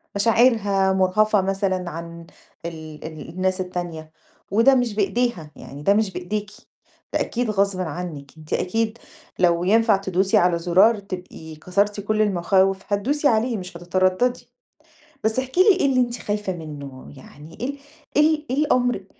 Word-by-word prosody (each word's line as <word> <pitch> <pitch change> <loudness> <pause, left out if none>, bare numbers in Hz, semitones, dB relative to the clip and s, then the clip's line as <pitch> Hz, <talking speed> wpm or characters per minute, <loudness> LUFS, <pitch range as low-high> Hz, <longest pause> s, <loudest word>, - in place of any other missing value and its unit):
مشاعرها 205 -3 +3
مرهَفة 195 +2 +3
مثلًا 190 -2 -1
عن 170 +1 -8 0.4
ال 160 -2 -8
ال 160 0 -8
الناس 185 +2 -1
التانية 175 -3 -6 0.4
وده 230 +6 +5
مش 240 -4 0
بإيديها، 200 -6 -1
يعني 140 +2 -10
ده 200 - +4
مش 210 -2 +1
بإيديكِ، 205 +4 -4 0.6
ده - - +1
أكيد 240 -1 -2
غصْبٍ 200 -2 0
عنِك، 160 -4 -6
أنتِ 155 -1 -8
أكيد 225 +4 -1 0.4
لو 175 -1 +3
ينفع 220 +1 +4
تدوسي 190 0 +1
على 175 -1 +3
زرار 190 +6 +4
تبقي 180 -5 -9
كسرتِ 200 +6 -1
كل 215 +1 0
المخاوف 190 0 +2
هتدوسي 265 +9 0
عليه 230 0 +1
مش 180 -2 -8
هتتردّدي، 185 +7 0 0.7
بس 220 +3 +1
احكِ 260 +5 -6
لي 380 +1 +6
إيه - - +2
اللي 260 -2 +2
أنتِ 240 -1 0
خايفة 205 -2 -3
منُّه، 145 -6 -9
يعني 150 +4 -14
إيه 245 - -3
ال 285 - -5 0.4
إيه - - +7
ال 300 0 -11
إيه 260 - -1
الأمر 245 -9 +1
195 Hz, 155 wpm, -22 LUFS, 175-220 Hz, 0.7 s, إيه